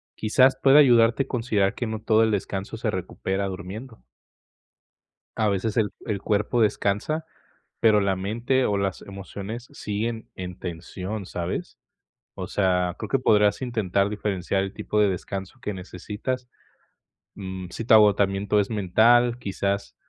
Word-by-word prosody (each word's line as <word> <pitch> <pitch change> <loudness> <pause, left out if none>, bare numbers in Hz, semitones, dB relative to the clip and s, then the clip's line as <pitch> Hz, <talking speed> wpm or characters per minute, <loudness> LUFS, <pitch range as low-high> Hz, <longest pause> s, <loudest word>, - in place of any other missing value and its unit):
Quizás, 130 +5 +4
pueda 135 +2 +7
ayudarte 120 -2 +5
a - - -16
considerar 110 -5 0
que 120 - -3
no 110 -1 -4
todo 110 0 +3
el 110 - +2
descanso 100 -1 -3
se - - -1
recupera 95 +1 -3
durmiendo. 100 +6 -8 1.4
A 110 - +2
veces 100 +3 -1
el 105 -3 +2
el 105 -4 -2
cuerpo 105 +3 +1
descansa, 105 +9 0 0.5
pero 110 -2 +5
la 100 -1 +1
mente, 115 +7 0
o 100 - +1
las 100 -1 -2
emociones 100 +4 -7
siguen 110 +2 -4
en 90 -1 -7
tensión, 95 +4 -6
¿sabes? 85 -1 -5 0.6
O - - -6
sea, 90 -3 +1
creo - - -5
que 135 - +2
podrás 105 0 +3
intentar 100 -5 0
diferenciar 100 -2 -1
el 95 - -6
tipo 105 - -1
de 105 - +4
descanso 95 +5 -5
que 105 - -3
necesitas, 105 +7 -5 0.9
mm, 95 -2 -6
sí 115 - -6
tu 115 - +4
agotamiento 100 -1 +4
es 100 - 0
mental, 115 +4 +4
quizás, 100 -2 -2
105 Hz, 145 wpm, -25 LUFS, 95-115 Hz, 1.4 s, pueda